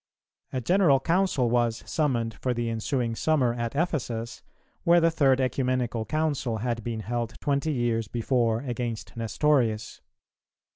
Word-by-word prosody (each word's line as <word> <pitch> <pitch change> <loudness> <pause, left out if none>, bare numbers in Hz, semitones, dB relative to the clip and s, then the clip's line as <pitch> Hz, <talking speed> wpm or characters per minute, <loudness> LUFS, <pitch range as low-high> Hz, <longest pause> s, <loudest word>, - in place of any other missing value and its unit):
A 130 - -2
general 175 -2 +4
Council 170 -4 +1
was 120 -1 +1
summoned 120 -7 0
for 125 +4 -2
the 120 -1 -1
ensuing 115 +1 -1
summer 130 -1 +1
at 120 +1 -4
Ephesus, 125 -8 -2 0.4
where 170 +1 +5
the 165 0 +3
third 135 -5 +3
Ecumenical 125 -3 0
Council 145 -7 -1
had 115 0 -2
been 115 -1 -3
held 120 +1 -3
twenty 145 +2 0
years 120 -4 0
before 115 0 0
against 120 -3 -4
Nestorius. 115 -1 0
120 Hz, 135 wpm, -27 LUFS, 115-140 Hz, 0.4 s, where